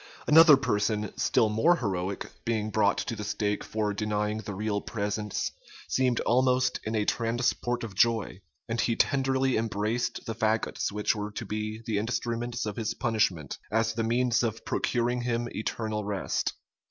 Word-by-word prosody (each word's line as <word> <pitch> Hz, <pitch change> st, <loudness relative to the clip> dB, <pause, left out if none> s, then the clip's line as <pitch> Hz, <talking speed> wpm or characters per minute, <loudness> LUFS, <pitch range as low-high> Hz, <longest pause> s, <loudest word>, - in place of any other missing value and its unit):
Another 155 Hz, -1 st, +8 dB
person, 105 Hz, -4 st, 0 dB
still 110 Hz, -, +3 dB
more 110 Hz, +12 st, +4 dB
heroic, 95 Hz, -, -3 dB
being 110 Hz, -2 st, -1 dB
brought 105 Hz, -1 st, +3 dB
to 115 Hz, -, -2 dB
the 105 Hz, -, -5 dB
stake 105 Hz, 0 st, -1 dB
for 105 Hz, -1 st, -1 dB
denying 105 Hz, 0 st, -1 dB
the 105 Hz, -2 st, -6 dB
real 105 Hz, 0 st, -1 dB
presence, 105 Hz, -1 st, -2 dB, 0.4 s
seemed 130 Hz, -2 st, +1 dB
almost 125 Hz, +1 st, +2 dB
in 110 Hz, +1 st, -2 dB
a 105 Hz, -1 st, +1 dB
transport 120 Hz, +1 st, 0 dB
of 110 Hz, -4 st, -6 dB
joy; 110 Hz, -2 st, +1 dB, 0.3 s
and 115 Hz, 0 st, 0 dB
he 115 Hz, -, +1 dB
tenderly 135 Hz, 0 st, +2 dB
embraced 110 Hz, +1 st, -1 dB
the 115 Hz, -, -3 dB
fagots 110 Hz, -1 st, 0 dB
which 105 Hz, +2 st, 0 dB
were 105 Hz, 0 st, -3 dB
to 105 Hz, +2 st, -6 dB
be 110 Hz, +2 st, -4 dB
the 110 Hz, -4 st, 0 dB
instruments 120 Hz, +1 st, -2 dB
of 105 Hz, -2 st, -4 dB
his 115 Hz, -1 st, -2 dB
punishment, 105 Hz, -, 0 dB
as 115 Hz, +1 st, +1 dB
the 115 Hz, 0 st, -1 dB
means 120 Hz, +1 st, +2 dB
of 115 Hz, -2 st, -2 dB
procuring 120 Hz, 0 st, 0 dB
him 120 Hz, -1 st, -1 dB
eternal 110 Hz, 0 st, -3 dB
rest. 100 Hz, -2 st, -1 dB
110 Hz, 160 wpm, -28 LUFS, 105-120 Hz, 0.4 s, Another